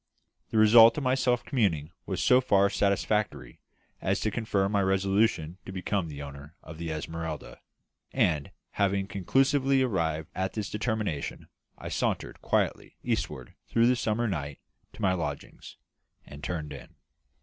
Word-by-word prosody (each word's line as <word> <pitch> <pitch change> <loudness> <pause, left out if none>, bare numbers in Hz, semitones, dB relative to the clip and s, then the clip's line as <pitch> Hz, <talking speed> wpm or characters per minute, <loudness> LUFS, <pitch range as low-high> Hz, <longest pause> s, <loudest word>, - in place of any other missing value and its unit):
The - - -1
result 115 +3 +8
of 150 - -2
my 130 0 +2
self 125 -2 +1
communing 85 - 0 0.2
was - - -2
so 125 +1 +5
far 100 -5 +3
satisfactory 100 - 0 0.4
as - - 0
to 110 - 0
confirm 100 -3 0
my 100 -1 +2
resolution 95 -3 +1
to - - -5
become 95 -1 -2
the 70 -2 -7
owner 70 +2 -10
of 80 0 -10
the 85 -1 -4
Esmeralda; 80 0 -5 0.5
and, 75 -4 +1 0.2
having 100 -1 +1
conclusively 135 +7 +2
arrived 80 -9 -1
at 95 +1 -2
this 105 -2 -4
determination, 105 - -3 0.3
I - - -7
sauntered - - -2
quietly - - -1
eastward 65 -2 -3
through 115 0 +3
the 125 +1 +4
summer 115 0 0
night 75 -7 -3 0.4
to - - -8
my 95 -1 +3
lodgings, 75 -6 -6 0.5
and 70 +1 -12
turned 80 -4 -4
in. - - -12
95 Hz, 150 wpm, -28 LUFS, 80-110 Hz, 0.5 s, result